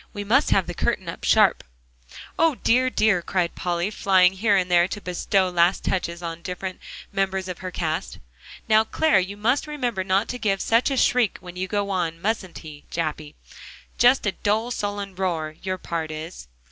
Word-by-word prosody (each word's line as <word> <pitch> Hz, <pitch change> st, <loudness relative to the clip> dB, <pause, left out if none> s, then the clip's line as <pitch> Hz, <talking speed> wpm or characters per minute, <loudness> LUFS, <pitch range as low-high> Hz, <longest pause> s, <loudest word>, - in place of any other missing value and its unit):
We 205 Hz, -, -4 dB
must 255 Hz, +8 st, +3 dB
have 190 Hz, -, +3 dB
the 175 Hz, -, -5 dB
curtain -, -, -1 dB
up -, -, -7 dB
sharp." -, -, +4 dB, 0.8 s
"O 325 Hz, -3 st, +4 dB
dear, 255 Hz, +2 st, +2 dB
dear!" 215 Hz, -7 st, +2 dB
cried 175 Hz, -1 st, -1 dB
Polly, 175 Hz, +2 st, -2 dB
flying 190 Hz, -3 st, +4 dB
here 205 Hz, +2 st, +2 dB
and 180 Hz, -1 st, -1 dB
there 175 Hz, 0 st, +5 dB
to 205 Hz, -, -5 dB
bestow 185 Hz, +1 st, 0 dB
last 175 Hz, +1 st, +2 dB
touches 175 Hz, -2 st, -2 dB
on 165 Hz, -1 st, -5 dB
the -, -, -27 dB
different 185 Hz, 0 st, -5 dB, 0.3 s
members 190 Hz, -1 st, -1 dB
of 180 Hz, -2 st, -6 dB
her 185 Hz, -, -5 dB
cast. 160 Hz, -3 st, -3 dB, 0.5 s
"Now, 220 Hz, 0 st, +5 dB
Clare, 225 Hz, -2 st, +2 dB
you 190 Hz, +2 st, -4 dB
must 245 Hz, +8 st, +1 dB
remember 245 Hz, -10 st, -2 dB
not 195 Hz, +3 st, +1 dB
to 250 Hz, -, -4 dB
give 200 Hz, -4 st, 0 dB
such 230 Hz, +6 st, +2 dB
a 270 Hz, -, -1 dB
shriek 245 Hz, -4 st, +2 dB
when 180 Hz, -1 st, -11 dB
you 185 Hz, +1 st, -3 dB
go 200 Hz, 0 st, -1 dB
on, 170 Hz, -3 st, -2 dB
mustn't 195 Hz, -2 st, -2 dB
he, 150 Hz, -2 st, -10 dB
Jappy? 155 Hz, -2 st, -4 dB, 0.6 s
Just 245 Hz, 0 st, +5 dB
a 205 Hz, -, +2 dB
dull, 220 Hz, +5 st, -1 dB
sullen 205 Hz, -3 st, -3 dB
roar, 170 Hz, -5 st, -2 dB
your 185 Hz, -1 st, -3 dB
part 165 Hz, -3 st, -4 dB
is." 155 Hz, -, -8 dB
190 Hz, 190 wpm, -24 LUFS, 175-215 Hz, 0.8 s, there